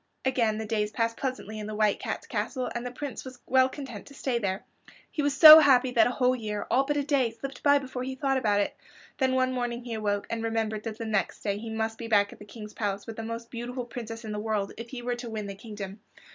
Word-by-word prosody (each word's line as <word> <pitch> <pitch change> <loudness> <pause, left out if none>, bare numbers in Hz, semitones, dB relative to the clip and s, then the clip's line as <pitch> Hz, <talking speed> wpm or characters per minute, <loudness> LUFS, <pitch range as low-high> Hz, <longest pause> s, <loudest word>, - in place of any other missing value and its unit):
Again 230 -5 +2
the 220 - -4
days 210 -1 0
passed 230 +1 -1
pleasantly 240 -5 -4
in 210 - -5
the 215 - -5
White 210 -1 +2
Cat's - - -4
castle, 255 -2 -3
and 240 - -3
the 250 - -3
Prince 265 -1 -6
was 260 -1 -9
well 260 0 +4
content 260 -7 -8
to 280 - -13
stay 255 -3 -1
there. 195 -3 -2 0.5
He 300 - -2
was 285 -1 0
so 310 +1 +13
happy 260 -4 +5
that 230 -3 +5
a 245 - -3
whole 255 0 +4
year, 210 -4 -4
all 270 +2 +4
but 295 0 0
a 285 - +1
day, 275 -4 +2
slipped 250 +3 -8
by 285 0 +5
before 265 -2 -5
he 260 +1 -4
thought 270 0 +1
about 205 -4 +2
it. - - -2 0.4
Then 260 -1 +2
one 255 0 +2
morning 245 -1 -2
he 240 -1 -5
awoke, 205 -2 -1
and 230 0 -2
remembered 225 -1 -2
that 220 -1 -4
the 230 - -5
next 215 -3 -1
day 200 -1 -1
he 225 +1 -6
must 220 0 -2
be 230 - -5
back 205 -2 +3
at - - -16
the 210 - -11
King's 210 0 -10
palace 200 -2 -3
with 225 - -7
the 225 - -5
most 230 +1 -6
beautiful 245 +1 -5
princess 230 -1 -7
in 215 - -5
the 210 - -3
world, 210 -2 -2
if 230 +1 -8
he 245 -1 -7
were 245 0 -1
to 240 -1 -6
win 215 -2 -4
the 200 - -5
kingdom. 205 -1 -8
230 Hz, 265 wpm, -28 LUFS, 215-255 Hz, 0.5 s, so